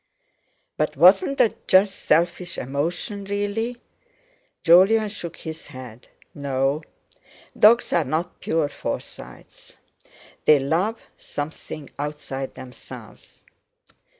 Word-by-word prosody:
"But 150 -1 -1
wasn't 190 - +6
that 245 -5 +1
just 190 +1 +5
selfish 175 +3 0
emotion, 165 - -3
really?" 205 +4 -2 0.9
Jolyon 195 +6 +6
shook 170 -5 -7
his 160 -1 -8
head. 130 -4 -11 0.3
"No, 140 +1 -1 0.7
dogs 230 +3 +5
are 170 - +3
not 160 +5 -3
pure 160 -2 0
Forsytes, 60 - -8 0.7
they 155 - +7
love 165 +11 0 0.2
something 150 0 -6
outside 145 -2 -5
themselves." 125 -1 -12
165 Hz, 95 wpm, -23 LUFS, 145-200 Hz, 0.9 s, they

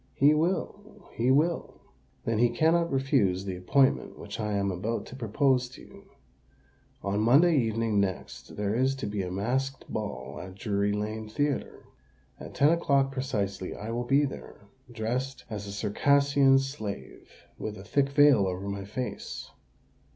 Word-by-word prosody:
"He 145 +2 +5
will—he 175 - -2
will." 155 +6 +1 0.5
"Then 115 -1 0
he 120 0 +5
cannot 165 +7 +2
refuse 130 -9 +1
the 95 -2 -3
appointment 130 +10 +2
which - - -8
I 105 -1 -1
am 100 -1 0
about 105 +6 -3
to - - -10
propose 125 +2 +1
to 130 - -13
you. - - -15 1.0
On 100 +1 -1
Monday 145 +10 +5
evening 115 -4 +1
next 95 -2 -3
there 105 0 -1
is 130 +3 +2
to 135 - -5
be 105 -1 -2
a 90 - -4
masked 130 +8 -2
ball 75 -10 -5
at 95 0 -9
Drury 100 0 0
Lane 105 +1 -3
Theatre. 145 +5 -2 0.6
At - - -10
ten 145 - +5
o'clock 140 -5 +2
precisely 110 -8 -3
I 110 +2 -6
will 120 +1 -2
be 140 +3 +3
there, 135 - -8 0.3
dressed 125 +4 -3
as 105 -1 -5
a - - -6
Circassian 140 +6 +3
slave, 135 -7 -5 0.3
with 105 -1 -5
a 95 - -10
thick 135 +6 +1
veil 140 -8 +5
over 95 +2 -4
my 100 -1 -4
face. 125 +5 -5
120 Hz, 155 wpm, -28 LUFS, 100-135 Hz, 1.0 s, He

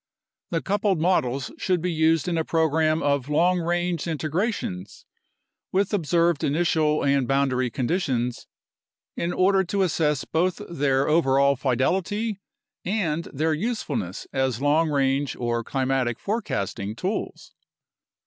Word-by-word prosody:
The 165 -1 -2
coupled 200 -2 +1
models 140 -7 0
should 180 -2 +1
be 180 +2 -1
used 160 0 +2
in 175 - 0
a 160 - +1
program 160 -1 +1
of 140 -1 0
long 175 +4 +3
range 175 0 -1
integrations 155 - -3 0.7
with 195 +2 +1
observed 170 -3 +1
initial 155 0 +1
and 140 -2 +2
boundary 135 -2 +1
conditions, 125 -2 -1 0.7
in 170 - -2
order 190 +1 +3
to 195 +2 0
assess 150 -5 0
both 175 +3 0
their 140 -4 +1
overall 140 -3 +3
fidelity 185 - 0 0.4
and 170 -5 -1
their 155 +3 -1
usefulness 155 - -3
as 130 -3 0
long 150 +3 +2
range 140 -1 +1
or 120 -1 -2
climatic 130 -2 -1
forecasting 105 - -3
tools. 190 - -4
155 Hz, 120 wpm, -24 LUFS, 135-175 Hz, 0.7 s, long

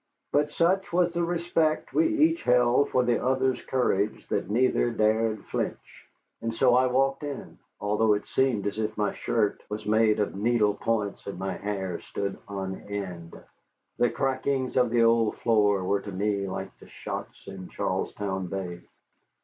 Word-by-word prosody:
But 145 +1 +2
such 180 +5 +1
was 175 0 +2
the 170 0 0
respect 170 -2 0
we 330 - +4
each 325 +1 +2
held 125 +3 +3
for 125 - +2
the 120 -1 +1
other's 130 0 +1
courage 105 -5 0
that - - -1
neither 120 +2 +2
dared 110 -1 +1
flinch. - - -5 0.3
And 115 0 -3
so 125 0 +4
I 130 +1 +4
walked 135 +2 +1
in, 145 -2 -7 0.2
although 105 +1 +2
it 105 - -4
seemed 130 -7 +1
as 100 +1 -2
if 110 0 -2
my 105 -1 0
shirt 110 -3 0
was 105 +1 -5
made 110 0 +3
of 105 - 0
needle 105 0 +2
points 105 -2 -2
and 100 - -5
my 95 +1 -3
hair 95 -3 -3
stood 100 -1 -4
on 95 -1 -5
end. 90 -5 -6 0.6
The 120 - +4
crackings 130 0 -1
of 125 -2 +3
the 115 0 +3
old 115 -1 +3
floor 105 -4 +2
were 100 +2 0
to 100 - -7
me 100 +1 -1
like 95 - -5
the - - -15
shots - - -7
in 95 -2 -8
Charlestown 95 -2 -2
Bay. 90 -2 -5
110 Hz, 165 wpm, -27 LUFS, 100-130 Hz, 0.6 s, we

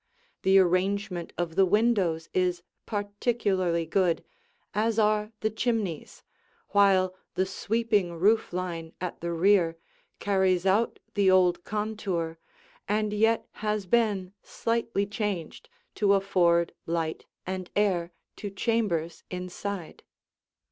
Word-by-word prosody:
The 190 +1 +5
arrangement 185 0 +1
of 170 -2 -2
the 195 - +5
windows 190 -5 +2
is 180 -1 +1 0.2
particularly 205 -5 0
good, 170 0 +1 0.5
as 220 +2 +1
are 210 0 +2
the 215 - 0
chimneys, 220 - -2 0.5
while 190 -2 +4 0.2
the 185 - +2
sweeping 205 -2 0
roof 205 +7 +2
line 170 -2 -4
at 180 -1 -5
the 170 0 -2
rear 170 -1 +3 0.4
carries 190 -2 +1
out 205 +5 +2 0.2
the 200 -3 +3
old 180 -2 +4
contour 200 -6 -3 0.5
and 210 0 0
yet 225 +2 +2
has 210 -2 -1
been 200 -3 +1
slightly 230 -3 -1
changed 205 - -4 0.3
to 200 -1 +5
afford 175 -3 +2
light 165 -1 -2 0.2
and 185 -1 -4
air 180 -4 +1 0.3
to 205 - -5
chambers 195 -6 -1
inside. 180 0 -5
195 Hz, 115 wpm, -27 LUFS, 175-210 Hz, 0.5 s, The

